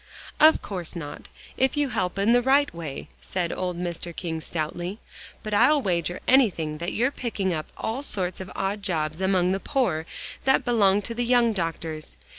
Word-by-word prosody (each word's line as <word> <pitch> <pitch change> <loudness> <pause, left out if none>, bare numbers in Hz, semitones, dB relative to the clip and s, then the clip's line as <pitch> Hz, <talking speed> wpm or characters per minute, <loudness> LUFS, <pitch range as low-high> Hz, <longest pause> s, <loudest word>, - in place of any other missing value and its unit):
"Of 310 +1 +6
course 180 -3 -5
not, 145 -3 -7 0.3
if 265 +2 +2
you 290 -2 +2
help 185 -5 -1
in 200 +3 +3
the 245 +1 +5
right 275 +3 +3
way," 160 -5 -6
said 175 -3 -2
old 180 -1 -3
Mr. 175 -1 -4
King 160 -2 -3
stoutly, 175 +5 -3 0.5
"but 215 - -4
I'll 295 +8 +5
wager 175 - -1
anything 175 - +3
that 170 +1 -3
you're 250 +5 +2
picking 205 -9 -2
up 155 -1 -3
all 230 +5 -2
sorts 185 -9 -3
of 185 - -8
odd 200 +2 -1
jobs 160 -3 -1
among 185 -1 +2
the 195 - 0
poor, 190 - 0 0.4
that 265 - +3
belong 205 -4 +3
to 230 - -4
the 240 +1 -1
young 240 -1 +4
doctors. 165 - -4
190 Hz, 180 wpm, -25 LUFS, 170-235 Hz, 0.5 s, Of